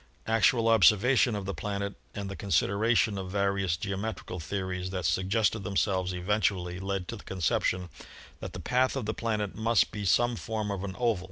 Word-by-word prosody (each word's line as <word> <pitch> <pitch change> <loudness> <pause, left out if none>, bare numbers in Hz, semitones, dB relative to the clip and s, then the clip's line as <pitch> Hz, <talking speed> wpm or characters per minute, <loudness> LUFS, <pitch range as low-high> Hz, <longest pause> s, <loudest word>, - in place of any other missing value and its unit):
Actual 115 +1 +3
observation 115 +3 +5
of 100 -2 -4
the 100 - -3
planet 100 0 -3 0.2
and 100 -1 -4
the 100 - -5
consideration 100 +2 +1
of 95 -1 -5
various 100 -3 0
geometrical 100 -1 -4
theories 90 +1 -3
that 95 -2 -3
suggested 100 +4 +1
themselves 95 -1 0
eventually 90 -1 -1
led 95 -1 -3
to 115 - -5
the 105 - -11
conception 90 0 0 0.5
that - - -7
the - - -6
path 125 +10 +1
of 130 -5 -2
the 110 - -1
planet 105 -4 -2
must 115 0 +2
be 105 - -5
some 120 +5 +3
form 110 -2 -3
of 100 -1 -3
an 95 -2 -5
oval. 115 -5 +1
100 Hz, 175 wpm, -29 LUFS, 95-110 Hz, 0.5 s, observation